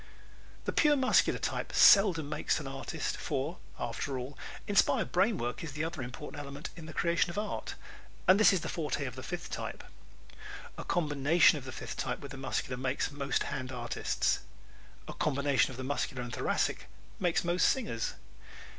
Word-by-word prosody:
The - - -1
pure 300 -2 +5
Muscular 260 -2 +3
type - - -3
seldom 185 -7 +7
makes 150 +1 0
an 150 - -7
artist, 135 0 -4
for, - - -3 0.2
after 135 -2 -3
all, 130 +3 -6 0.3
inspired 205 -1 +3
brain 200 +4 +3
work 120 +5 -3
is 155 -4 -6
the 150 +2 -2
other 165 -3 -3
important 125 +4 -6
element 140 +1 -7
in 165 -2 -9
the - - -7
creation 170 +2 +1
of 170 - -7
art, 210 0 -3 0.5
and 185 +2 +7
this 215 - +7
is 190 -4 +1
the - - -4
forte 150 -3 -2
of 125 -2 -5
the 130 - -7
fifth 175 +5 -6
type. - - -5 0.9
A - - -6
combination 155 -1 +3
of 130 - -12
the 130 - -6
fifth - - -7
type 125 -1 -2
with 140 -2 -9
the 135 - -7
Muscular 130 -1 -2
makes 130 +3 -1
most 140 -2 -1
hand 130 -2 -4
artists. 120 -2 0 0.7
A - - -6
combination 140 -2 +2
of 130 - -8
the 130 - -5
Muscular 135 -2 -2
and 120 0 -7
Thoracic - - 0 0.3
makes 175 -3 +1
most 175 +1 +3
singers. 215 - -1
145 Hz, 180 wpm, -31 LUFS, 130-175 Hz, 0.9 s, seldom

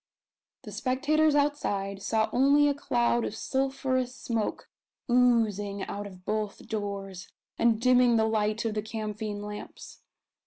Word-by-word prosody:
The - - -9
spectators 295 +4 +1
outside 205 -10 0
saw 220 +2 +1
only 280 +3 +5
a 285 - +2
cloud 240 -4 +1
of 210 - -3
sulphurous 260 0 -1
smoke 230 -4 -3 0.4
oozing 220 -5 +2
out 205 0 -5
of 185 -2 -14
both 215 -1 -3
doors, 200 -3 -5 0.3
and 230 -2 +3
dimming 250 -1 +4
the 220 -1 +3
light 215 0 0
of 225 - 0
the 210 - -1
camphine 215 -1 -5
lamps. 210 0 -9
225 Hz, 130 wpm, -28 LUFS, 205-255 Hz, 0.4 s, only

